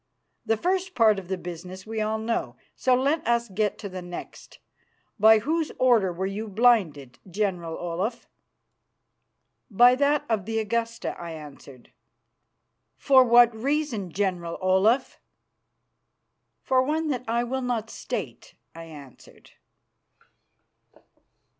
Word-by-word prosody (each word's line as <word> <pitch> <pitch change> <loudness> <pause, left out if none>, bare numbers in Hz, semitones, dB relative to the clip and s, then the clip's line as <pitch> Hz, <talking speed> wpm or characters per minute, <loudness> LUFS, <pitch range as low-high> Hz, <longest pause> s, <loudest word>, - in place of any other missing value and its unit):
The 225 - +2
first 370 - -1
part 215 -4 +4
of 185 - -12
the 190 0 -2
business 180 +2 -9
we 220 0 -4
all 215 +1 -1
know, 225 +1 -3 0.2
so 255 -1 +2
let 280 +5 +1
us 235 -1 +1
get 205 +1 -1
to 205 - -7
the 185 -1 -7
next. 175 0 -10 0.6
By 220 +2 +7
whose 310 +8 -1
order 235 -7 +3
were 180 +2 -4
you 205 +3 -4
blinded, 190 - +1
General 180 -4 -2
Olaf?" 185 +7 -4 1.4
"By 245 +4 +6
that 285 +3 +1
of 220 -5 -1
the 225 +1 -3
Augusta," 230 +1 -2
I 170 -1 -6
answered. 140 -4 -12 1.1
"For 265 -2 +5
what 240 -1 +5
reason, 250 - -2
General 180 -3 -2
Olaf?" 195 +7 +2 1.4
"For 260 -1 +2
one 310 +4 -1
that 250 -3 -2
I 235 +1 0
will 260 +2 -3
not 235 -3 -3
state," - - -6 0.2
I 165 0 -10
answered. 145 -5 -15
220 Hz, 125 wpm, -25 LUFS, 185-245 Hz, 1.4 s, By